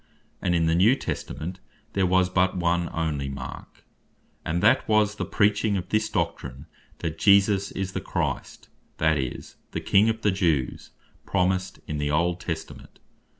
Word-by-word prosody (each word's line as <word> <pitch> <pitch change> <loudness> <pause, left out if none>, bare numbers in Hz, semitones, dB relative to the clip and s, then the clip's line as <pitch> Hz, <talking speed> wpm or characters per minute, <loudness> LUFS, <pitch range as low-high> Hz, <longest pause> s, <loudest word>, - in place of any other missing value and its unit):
and 90 - +1
in 85 -1 +2
the 80 - +2
New 100 +9 +5
Testament 90 - -5 0.3
there 95 -2 +2
was 95 0 +3
but 95 0 +1
one 85 -1 +1
onely 75 -4 -2
mark; 70 - -8 0.6
and 85 +2 -2
that 130 - +4
was 105 -1 +3
the - - -2
preaching 105 0 +2
of 90 0 -5
this 110 0 +1
Doctrine, 80 -6 -3 0.4
That 80 -1 -4
Jesus 100 -1 +4
Is 95 -1 -3
The - - -3
Christ, - - -3 0.3
that 80 -1 +2
is, 65 -2 -5 0.2
the - - -1
King 105 +3 +4
of 110 0 -2
the 105 - +4
Jews, 85 -9 0 0.4
promised 95 0 0
in 75 -1 -4
the 75 0 -1
Old 85 +4 +1
Testament. 80 -3 -7
90 Hz, 160 wpm, -25 LUFS, 80-100 Hz, 0.6 s, New